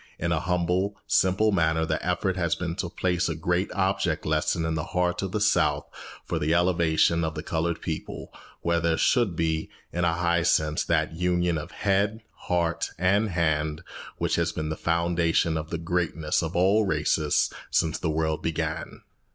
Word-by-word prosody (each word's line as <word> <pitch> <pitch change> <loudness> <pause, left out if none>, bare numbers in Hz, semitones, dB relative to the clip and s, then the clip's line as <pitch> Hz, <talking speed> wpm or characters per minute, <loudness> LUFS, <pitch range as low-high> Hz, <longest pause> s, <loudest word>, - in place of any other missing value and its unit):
In 85 +1 -2
a 85 - +2
humble, 90 +4 0
simple 95 +4 +3
manner 80 -3 +2
the - - -2
effort 95 -2 0
has 85 -3 0
been 85 -2 -3
to 90 - -2
place 90 0 0
a 80 - -2
great 90 +4 -1
object 95 -4 0
lesson 80 +2 0
in 80 - -1
the 80 -1 -2
heart 90 0 +1
of 95 -2 -3
the 105 - -1
South 105 - +2 0.4
for - - -2
the 80 +3 +1
elevation 85 -1 +2
of 80 0 -2
the 75 - -5
coloured 85 +1 -2
people, 80 -2 -5 0.3
where 85 0 +1
there 85 -1 +1
should 120 -9 +2
be, 80 -1 -1 0.2
in 90 - -1
a 85 -1 +2
high 85 0 +1
sense, 80 -2 +2
that - - +1
union 90 -1 0
of 75 - -7
head, 100 +2 0
heart, 85 -1 -1
and 100 +5 +2
hand 80 -2 0 0.3
which - - 0
has 85 0 +1
been 80 -1 -4
the 80 - -2
foundation 85 -1 +1
of 80 0 -4
the 85 - -2
greatness 80 -2 -1
of 80 -1 -4
all 95 +5 +4
races 80 -6 +1 0.2
since 80 -1 +1
the 80 - -1
world 80 0 -1
began. 80 -1 -3
85 Hz, 180 wpm, -26 LUFS, 80-90 Hz, 0.4 s, all